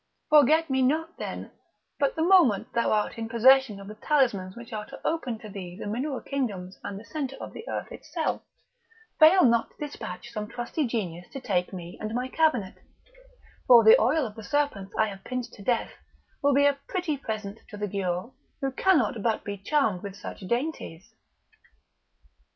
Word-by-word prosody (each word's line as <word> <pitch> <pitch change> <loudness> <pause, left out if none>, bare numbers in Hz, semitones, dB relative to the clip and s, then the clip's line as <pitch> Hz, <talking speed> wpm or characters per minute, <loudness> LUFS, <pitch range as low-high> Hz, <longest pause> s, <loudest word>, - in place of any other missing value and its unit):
Forget 305 +2 +6
me 265 -2 +1
not, 315 +6 0
then, - - -6 0.5
but 280 -1 +1
the 320 - 0
moment 340 - +4
thou 235 - +1
art 215 +1 0
in 225 0 -4
possession 245 -2 +5
of 195 - -10
the 210 - -7
talismans 215 -7 +1
which 235 -1 -10
are 210 -1 -4
to - - -10
open 270 -8 -1
to 215 - -11
thee 185 -3 -8
the - - -6
mineral 255 +6 -2
kingdoms 200 -10 -4
and 200 -1 -5
the 220 - -13
centre 275 -3 -4
of - - -8
the 450 - -9
earth - - -4
itself, - - -3 0.8
fail 345 +4 +8
not 235 -1 +3
to - - -28
despatch 235 -6 -8
some 210 -2 -4
trusty 240 +6 -2
genius 180 -7 -4
to 270 - -7
take 185 -8 -1
me 175 -2 -8
and 215 +1 -3
my 250 +1 -1
cabinet, 255 -10 +1 0.9
for 240 -2 +9
the 220 - +8
oil 285 +6 +2
of 215 - -6
the 220 0 -10
serpents 215 -7 -1
I 220 - +4
have 195 -2 -8
pinched 250 -2 -4
to - - -12
death 235 +3 0 0.5
will 285 -1 +3
be 285 +1 +5
a 285 -1 +3
pretty 360 -6 -1
present 220 -5 -5
to 210 - -9
the 210 0 -2
Giaour, 190 +3 -3 0.3
who 270 -2 -1
cannot 260 - +2
but 225 +1 0
be 205 - -4
charmed 205 -2 0
with 200 -1 -7
such - - -8
dainties." 235 - -4
235 Hz, 185 wpm, -27 LUFS, 205-280 Hz, 0.9 s, for